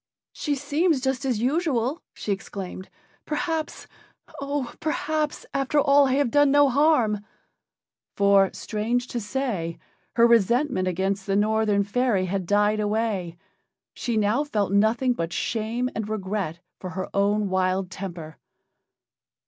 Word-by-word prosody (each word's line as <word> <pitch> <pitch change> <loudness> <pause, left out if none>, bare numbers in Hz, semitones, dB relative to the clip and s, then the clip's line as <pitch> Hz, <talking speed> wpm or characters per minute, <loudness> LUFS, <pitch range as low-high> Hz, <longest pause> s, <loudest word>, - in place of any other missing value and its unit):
"She 295 -2 -2
seems 290 +3 +1
just 265 +1 -1
as 250 -5 0
usual," 280 0 0
she 210 - -4
exclaimed. 190 -1 -5 0.3
"Perhaps 315 +1 -3 0.6
oh! 280 -3 -3
perhaps 310 -1 -2
after 275 +2 +1
all 280 0 +5
I 260 - +1
have 275 -3 +1
done 290 +1 +5
no 285 0 +5
harm." 250 -7 +2 0.9
For, 200 -1 +4
strange 230 +3 -2
to 240 - -3
say, 210 -8 -3 0.4
her 235 0 +6
resentment 235 -1 +3
against 190 +2 -1
the 195 - +1
Northern 210 -1 +2
fairy 205 -2 +1
had 185 -1 -3
died 205 +2 +2
away. 205 -5 -1 0.6
She 235 -3 -2
now 215 +7 +2
felt 210 -9 -1
nothing 220 +5 +3
but 165 -7 -3
shame 230 +5 -1
and 215 -1 -4
regret 190 -5 -3 0.2
for 185 - -6
her 185 - -2
own 200 +1 +1
wild 185 0 0
temper. 170 -5 -7
220 Hz, 130 wpm, -25 LUFS, 195-270 Hz, 0.9 s, her